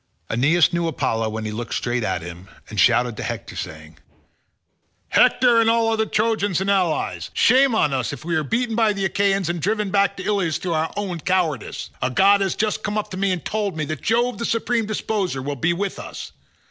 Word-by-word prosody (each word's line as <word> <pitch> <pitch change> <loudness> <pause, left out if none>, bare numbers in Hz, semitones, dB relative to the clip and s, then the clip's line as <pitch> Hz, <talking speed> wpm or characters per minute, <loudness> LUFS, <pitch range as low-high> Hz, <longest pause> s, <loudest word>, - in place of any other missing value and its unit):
Aeneas 150 +9 +3
knew 170 0 0
Apollo 115 -7 -1
when 110 0 -5
he 110 - -3
looked 115 +2 -4
straight 120 -1 -1
at 85 - -2
him, 85 +2 -9 0.2
and 105 - -3
shouted 120 +3 +3
to - - -4
Hector - - -5
saying, 80 -1 -8 1.1
"Hector 245 -2 +4
and 225 - +3
all 230 0 +3
other 220 -1 0
Trojans 210 -4 0
and 195 +1 0
allies, 155 - 0
shame 260 0 +4
on 150 -9 +2
us 130 -3 -1
if - - -8
we 170 -1 -1
are 155 - +1
beaten 230 - -1
by 220 -2 +3
the 195 -1 -2
Achaeans 195 -1 +1
and 170 -1 -2
driven 210 +2 -1
back 200 0 +2
to 185 - -6
Ilius 195 -6 0
through 180 -2 -3
our 160 0 -1
own 190 -4 -3
cowardice. 165 - -1
A 125 - +1
god 200 +8 +4
has 195 - 0
just 215 -1 -1
come 210 0 -2
up 215 - -3
to 185 - -5
me 195 0 +1
and 180 -2 -3
told 205 -5 -2
me 155 - -1
that 155 +1 -5
Jove 240 +2 +1
the 235 - -2
supreme 230 -1 0
disposer 205 -7 -2
will 140 +2 -4
be 160 +6 +1
with 195 +3 -3
us. - - -8
185 Hz, 215 wpm, -22 LUFS, 140-215 Hz, 1.1 s, Hector